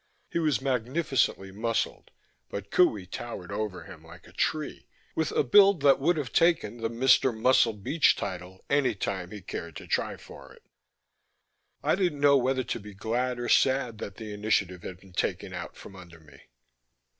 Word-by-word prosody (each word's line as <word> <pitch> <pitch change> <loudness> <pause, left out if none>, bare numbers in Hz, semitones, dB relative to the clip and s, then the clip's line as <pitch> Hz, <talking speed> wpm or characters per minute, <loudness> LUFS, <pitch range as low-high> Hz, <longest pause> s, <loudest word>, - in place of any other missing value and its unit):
He - - 0
was 155 -5 +1
magnificently 130 - 0
muscled 115 +3 -2 0.4
but 100 0 -7
Qohey 110 - +3
towered 95 -3 -7
over 105 -4 -4
him - - -12
like - - -14
a - - -16
tree, 155 -2 -2 0.3
with 160 -1 -1
a - - +2
build 195 +5 +6
that 140 -1 +6
would 165 +5 +2
have 135 -7 -4
taken 165 -9 +2
the 115 -1 -2
Mr. 125 +2 +4
Muscle 120 -1 +4
Beach 125 +10 +2
title 95 -1 -6
any 140 -5 +2
time 95 -2 -3
he 105 -2 -9
cared 85 -2 -6
to - - -8
try - - -1
for - - -13
it. - - -22 1.2
I - - +2
didn't 175 -6 0
know 140 0 +5
whether 130 0 +1
to 120 - -4
be 105 -1 -11
glad 120 +4 -1
or 120 - -3
sad 130 -5 +2
that 100 - -6
the 110 -2 -7
initiative 100 -4 0
had 90 0 -8
been 95 -1 -18
taken - - -2
out - - -7
from 95 - -12
under 85 -3 -13
me. 75 -4 -18
115 Hz, 180 wpm, -28 LUFS, 100-140 Hz, 1.2 s, build